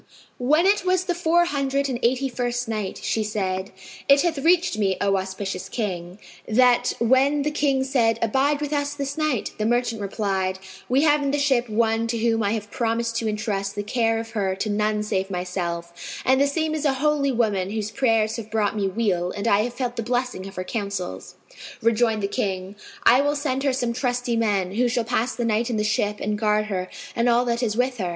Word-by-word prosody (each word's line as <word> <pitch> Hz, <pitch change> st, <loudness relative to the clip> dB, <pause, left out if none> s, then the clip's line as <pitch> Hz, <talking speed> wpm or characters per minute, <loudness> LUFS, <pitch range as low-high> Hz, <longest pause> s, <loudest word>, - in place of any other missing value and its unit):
When 300 Hz, +8 st, +3 dB
it 405 Hz, +2 st, +3 dB
was 370 Hz, 0 st, +2 dB
the 365 Hz, -1 st, -1 dB
Four 345 Hz, 0 st, +3 dB
Hundred 280 Hz, -3 st, 0 dB
and 250 Hz, -3 st, -3 dB
Eighty 260 Hz, +3 st, +2 dB
first 245 Hz, -1 st, -2 dB
Night, 215 Hz, -4 st, -3 dB
She 220 Hz, -, 0 dB
said, 190 Hz, -2 st, -2 dB, 0.4 s
It 280 Hz, 0 st, +7 dB
hath 335 Hz, -4 st, 0 dB
reached 350 Hz, +4 st, +3 dB
me, 195 Hz, -3 st, +1 dB
O 200 Hz, -1 st, +2 dB
auspicious 190 Hz, 0 st, -4 dB
King, 180 Hz, -5 st, -4 dB, 0.3 s
that 245 Hz, +2 st, +4 dB
when 265 Hz, +5 st, +3 dB
the 300 Hz, -, 0 dB
King 280 Hz, -3 st, +1 dB
said, 240 Hz, -4 st, +2 dB
"Abide 270 Hz, +6 st, +1 dB
with 295 Hz, 0 st, -2 dB
us 285 Hz, 0 st, -1 dB
this 280 Hz, -1 st, -3 dB
night," 305 Hz, -8 st, -1 dB
the 215 Hz, -, 0 dB
merchant 240 Hz, -2 st, 0 dB
replied, 195 Hz, -2 st, -1 dB, 0.3 s
"We 265 Hz, +4 st, +3 dB
have 300 Hz, -1 st, +4 dB
in 280 Hz, -, 0 dB
the 285 Hz, -, +1 dB
ship 265 Hz, -4 st, +1 dB
one 225 Hz, +1 st, +1 dB
to 230 Hz, 0 st, -1 dB
whom 225 Hz, 0 st, +1 dB
I 205 Hz, 0 st, +1 dB
have 210 Hz, -2 st, -4 dB
promised 230 Hz, -1 st, -1 dB
to 225 Hz, -1 st, -1 dB
entrust 200 Hz, -2 st, -2 dB
the 205 Hz, -, -2 dB
care 225 Hz, +1 st, +1 dB
of 225 Hz, 0 st, -5 dB
her 195 Hz, -4 st, -1 dB
to 210 Hz, +2 st, -2 dB
none 210 Hz, 0 st, 0 dB
save 195 Hz, -2 st, -1 dB
myself; 175 Hz, -2 st, -3 dB, 0.3 s
and 260 Hz, +1 st, +4 dB
the 280 Hz, -, +4 dB
same 315 Hz, +2 st, -1 dB
is 310 Hz, -1 st, -2 dB
a 280 Hz, -, +3 dB
holy 290 Hz, -2 st, +2 dB
woman 210 Hz, -6 st, 0 dB
whose 215 Hz, 0 st, -3 dB
prayers 225 Hz, -3 st, +1 dB
have 220 Hz, -2 st, -7 dB
brought 215 Hz, -1 st, 0 dB
me 200 Hz, -2 st, 0 dB
weal 190 Hz, -4 st, 0 dB
and 205 Hz, +4 st, -4 dB
I 200 Hz, -, +4 dB
have 240 Hz, +3 st, -1 dB
felt 250 Hz, -2 st, -3 dB
the -, -, 0 dB
blessing 245 Hz, -4 st, -2 dB
of 195 Hz, -, -11 dB
her 185 Hz, -, -3 dB
counsels." 200 Hz, -, -4 dB, 0.4 s
Rejoined 225 Hz, -1 st, +2 dB
the -, -, +2 dB
King, 190 Hz, -1 st, -3 dB, 0.3 s
"I 250 Hz, +3 st, +6 dB
will 290 Hz, +1 st, +1 dB
send 275 Hz, -3 st, -1 dB
her 275 Hz, -1 st, +2 dB
some 245 Hz, -2 st, -1 dB
trusty 245 Hz, -1 st, -1 dB
men, 205 Hz, -5 st, +1 dB
who 245 Hz, +4 st, +2 dB
shall 240 Hz, 0 st, 0 dB
pass 235 Hz, +1 st, -1 dB
the 240 Hz, -, -2 dB
night 230 Hz, +2 st, +1 dB
in 235 Hz, -, -1 dB
the 210 Hz, -, +1 dB
ship 210 Hz, -1 st, 0 dB
and 210 Hz, 0 st, -2 dB
guard 215 Hz, -1 st, +2 dB
her 185 Hz, -1 st, -3 dB, 0.3 s
and 235 Hz, +1 st, +2 dB
all 240 Hz, +1 st, +3 dB
that 235 Hz, 0 st, 0 dB
is 220 Hz, -3 st, -1 dB
with 250 Hz, 0 st, +1 dB
her." 180 Hz, -3 st, -1 dB
230 Hz, 215 wpm, -24 LUFS, 205-265 Hz, 0.4 s, It